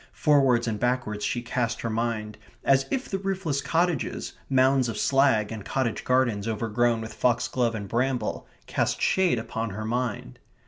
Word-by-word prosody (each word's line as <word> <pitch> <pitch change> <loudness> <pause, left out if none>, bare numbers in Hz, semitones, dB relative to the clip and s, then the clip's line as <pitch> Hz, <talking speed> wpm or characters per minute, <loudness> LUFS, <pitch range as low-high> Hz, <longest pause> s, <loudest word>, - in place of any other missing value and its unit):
Forwards 135 -6 +3
and 110 -2 -2
backwards 120 -4 -1
she 120 - -1
cast 120 -1 -2
her 115 - -2
mind, 110 -2 -2 0.2
as 135 0 +3
if 265 -1 -2
the 195 - -2
roofless 190 -7 -1
cottages, 165 +4 -1 0.2
mounds 130 -1 +3
of 115 - -4
slag, 135 -6 +3
and 110 -3 -6
cottage 130 -1 -2
gardens 120 -5 +1
overgrown 115 +1 +1
with 110 - -7
foxglove 120 -1 +1
and 100 -2 -5
bramble 120 +1 -1 0.2
cast - - -1
shade 185 -8 +2
upon 115 0 -3
her 110 +2 -5
mind. 115 - -3
120 Hz, 155 wpm, -26 LUFS, 110-135 Hz, 0.2 s, Forwards